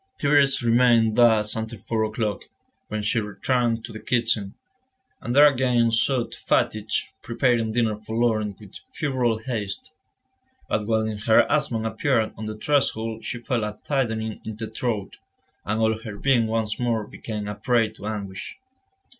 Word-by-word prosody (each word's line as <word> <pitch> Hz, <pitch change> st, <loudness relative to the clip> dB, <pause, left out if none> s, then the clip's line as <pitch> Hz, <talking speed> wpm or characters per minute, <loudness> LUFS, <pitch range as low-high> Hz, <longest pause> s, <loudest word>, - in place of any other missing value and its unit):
Thérèse 140 Hz, -2 st, +3 dB
remained 115 Hz, -2 st, +4 dB
thus 110 Hz, -3 st, +4 dB
until 110 Hz, +1 st, -4 dB
four 110 Hz, +3 st, -1 dB
o'clock, 110 Hz, -3 st, -3 dB, 0.4 s
when 110 Hz, 0 st, -3 dB
she 115 Hz, +3 st, +1 dB
returned 115 Hz, +2 st, -1 dB
to 115 Hz, -, -10 dB
the 110 Hz, -, -7 dB
kitchen, 115 Hz, -5 st, 0 dB, 0.7 s
and 120 Hz, -, -3 dB
there 145 Hz, +1 st, +9 dB
again 125 Hz, -4 st, +3 dB
sought 120 Hz, +2 st, +1 dB
fatigue, 110 Hz, 0 st, 0 dB, 0.3 s
preparing 115 Hz, -2 st, +1 dB
dinner 115 Hz, -2 st, +1 dB
for 110 Hz, +1 st, -7 dB
Laurent 110 Hz, -4 st, 0 dB
with 105 Hz, -3 st, -12 dB, 0.2 s
febrile 130 Hz, -7 st, 0 dB
haste. 110 Hz, -4 st, -5 dB, 0.7 s
But 105 Hz, 0 st, -1 dB
when 110 Hz, -2 st, 0 dB
her 110 Hz, +2 st, +5 dB
husband 125 Hz, -7 st, 0 dB
appeared 110 Hz, +1 st, 0 dB
on 110 Hz, -, -6 dB
the 110 Hz, 0 st, -5 dB
threshold 115 Hz, -5 st, 0 dB
she 120 Hz, -, -5 dB
felt 120 Hz, -2 st, -1 dB
a 105 Hz, 0 st, -4 dB
tightening 115 Hz, -6 st, -1 dB
in 110 Hz, -, -6 dB
the 110 Hz, 0 st, -6 dB
throat, 110 Hz, -6 st, -3 dB, 0.5 s
and 110 Hz, +2 st, -1 dB
all 110 Hz, 0 st, +2 dB
her 105 Hz, -2 st, -8 dB
being 120 Hz, -2 st, +2 dB
once 110 Hz, -1 st, -1 dB
more 115 Hz, -3 st, 0 dB
became 105 Hz, -1 st, -6 dB
a 105 Hz, -, -3 dB
prey 115 Hz, +1 st, +1 dB
to 105 Hz, -1 st, -9 dB
anguish. 100 Hz, -3 st, -5 dB
110 Hz, 155 wpm, -24 LUFS, 110-120 Hz, 0.7 s, there